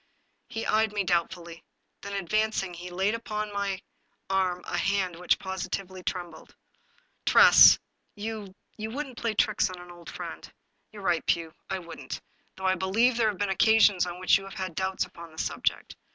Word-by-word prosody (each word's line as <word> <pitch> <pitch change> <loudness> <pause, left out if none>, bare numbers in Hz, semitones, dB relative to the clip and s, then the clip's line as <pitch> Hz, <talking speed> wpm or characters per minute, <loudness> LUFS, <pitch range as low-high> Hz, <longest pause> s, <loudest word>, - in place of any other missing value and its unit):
He 225 - -4
eyed 220 -1 +2
me 205 -1 0
doubtfully. 170 -1 -2 0.4
Then, 200 0 -7
advancing, 200 0 0
he 175 +1 -8
laid 190 +4 0
upon 215 -2 -4
my 200 -1 -2 0.5
arm 185 -2 +1
a - - -4
hand 195 -3 0
which 180 +1 +2
positively 190 0 -5
trembled. 175 -3 -6 0.4
" - - -38
Tress, - - +9 0.4
you 210 -2 -6
— - - -39
you 215 +1 -3
wouldn't 265 0 -5
play 230 -2 -1
tricks 215 0 +2
on 185 -1 -8
an 175 0 -11
old 175 -1 -12
friend." - - -8 0.2
" - - -47
You 210 - -10
are - - -11
right, 170 -3 +1
Pugh, 165 -2 0 0.2
I 190 - -1
wouldn't, 170 -2 -7 0.4
though 190 - -7
I 185 - +4
believe 205 +7 +2
there 225 -2 +3
have 205 - -4
been 205 0 -1
occasions 205 -2 +4
on 175 0 -6
which 185 +1 +4
you - - -10
have 195 - -10
had 185 -2 -4
doubts 190 +2 -1
upon 170 -1 -12
the 160 - -18
subject. - - -2
190 Hz, 190 wpm, -28 LUFS, 180-210 Hz, 0.5 s, Tress